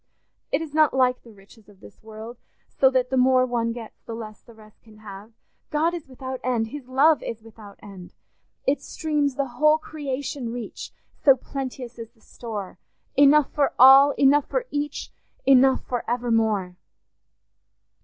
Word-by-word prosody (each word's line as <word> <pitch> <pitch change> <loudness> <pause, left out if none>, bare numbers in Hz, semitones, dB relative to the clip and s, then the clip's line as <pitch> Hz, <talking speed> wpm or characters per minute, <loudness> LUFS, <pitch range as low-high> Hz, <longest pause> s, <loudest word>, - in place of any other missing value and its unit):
It - - 0
is 300 -3 -10
not 310 -3 +3
like 255 -1 +2
the 235 - -16
riches 205 +2 -20
of 200 -2 -20
this - - -16
world, 220 +2 -10 0.3
so 265 - +3
that 255 -1 -1
the 265 - 0
more 255 0 +4
one 235 -2 -1
gets 230 -2 -10
the 230 - -8
less 215 -2 -9
the 235 - -18
rest 215 -1 -19
can 220 -2 -19
have. 210 0 -11 0.4
God 320 +3 0
is 340 -5 -7
without 260 0 -7
end; 235 -3 -1
his 285 -1 -9
love 285 +4 +3
is 225 -1 -7
without 215 -2 -14
end—" 190 -3 -12 0.5
Its 280 +2 0
streams 295 -3 -2
the 280 - -1
whole 305 +4 +2
creation 280 -5 -5
reach, 240 -1 -7 0.2
So 275 -2 +4
plenteous 255 -2 -7
is 225 -1 -8
the 230 - -31
store; 215 -6 -8 0.4
Enough 285 0 +5
for 285 -2 0
all, 270 +3 +8
enough 280 +1 +3
for - - -2
each, 290 0 -4 0.3
Enough 265 0 +4
for 245 -2 -3
evermore. 225 -6 0
255 Hz, 165 wpm, -24 LUFS, 225-280 Hz, 0.5 s, all